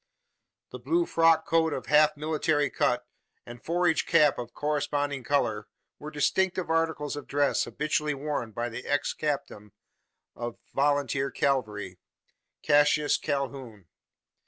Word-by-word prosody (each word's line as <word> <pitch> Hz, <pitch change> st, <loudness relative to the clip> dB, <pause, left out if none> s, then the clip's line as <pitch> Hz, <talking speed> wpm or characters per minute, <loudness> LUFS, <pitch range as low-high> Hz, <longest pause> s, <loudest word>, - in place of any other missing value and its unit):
The -, -, -8 dB
blue 345 Hz, 0 st, +1 dB
frock 165 Hz, -, +3 dB
coat 160 Hz, -1 st, +2 dB
of 130 Hz, -, -5 dB
half 150 Hz, 0 st, +4 dB
military 150 Hz, -2 st, 0 dB
cut, -, -, 0 dB, 0.4 s
and 120 Hz, 0 st, -11 dB
forage 175 Hz, -1 st, +1 dB
cap 150 Hz, -6 st, +4 dB
of 120 Hz, 0 st, -6 dB
corresponding 145 Hz, -1 st, -2 dB
colour, 115 Hz, -6 st, 0 dB, 0.3 s
were 150 Hz, -, -7 dB
distinctive 175 Hz, +4 st, 0 dB
articles 160 Hz, -3 st, 0 dB
of 145 Hz, -, -8 dB
dress 145 Hz, 0 st, +1 dB
habitually 150 Hz, 0 st, -1 dB
worn 140 Hz, -5 st, -3 dB
by 120 Hz, +3 st, -3 dB
the 120 Hz, +2 st, -7 dB
ex 145 Hz, -1 st, 0 dB
captain 135 Hz, -9 st, -4 dB, 0.6 s
of 120 Hz, 0 st, -5 dB, 0.2 s
volunteer 140 Hz, -1 st, +1 dB
cavalry 105 Hz, -9 st, -2 dB, 0.6 s
Cassius 145 Hz, 0 st, +3 dB
Calhoun. 135 Hz, -, -4 dB
145 Hz, 125 wpm, -27 LUFS, 130-155 Hz, 0.6 s, half